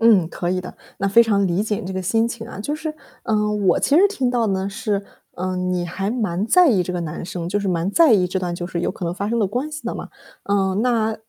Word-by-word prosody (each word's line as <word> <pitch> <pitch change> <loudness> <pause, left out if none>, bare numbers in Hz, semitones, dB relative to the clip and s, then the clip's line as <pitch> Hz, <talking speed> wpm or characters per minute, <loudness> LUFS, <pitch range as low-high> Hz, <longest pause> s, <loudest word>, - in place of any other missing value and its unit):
嗯， 210 -8 +5
可 175 0 -3
以 185 0 0
的， - - -9 0.2
那 200 - 0
非 230 +4 +7
常 200 -3 +2
理 180 +2 +1
解 215 -1 -1
你 - - -6
这 190 - -4
个 190 0 -3
心 225 +5 +1
情 230 -1 -6
啊。 230 - -9
就 290 +8 -2
是， 310 0 -5 0.3
嗯， 210 -2 0
我 175 - +4
其 290 - +3
实 380 +4 +7
听 270 -12 -1
到 240 -2 +1
呢 190 0 -1
是， 200 0 -2 0.3
嗯， 185 0 -2
你 175 -1 -1
还 195 +4 -3
蛮 210 -5 -1
在 360 +7 +6
意 200 -8 +3
这 180 - -4
个 180 - -2
男 165 0 -5
生， 170 -1 -5
就 205 - 0
是 200 - -3
蛮 175 0 0
在 315 +4 +5
意 185 -4 +4
这 185 +1 -2
段 180 -2 -3
就 175 0 -4
是 175 -1 -3
有 - - 0
可 - - -6
能 170 - -2
发 200 +2 -3
生 235 - 0
的 210 - +2
关 250 +10 -3
系 305 - -6
的 - - -2
嘛。 - - -6 0.4
嗯， 195 0 +1
那 225 -3 +1
200 Hz, 300 characters per minute, -21 LUFS, 180-230 Hz, 0.4 s, 非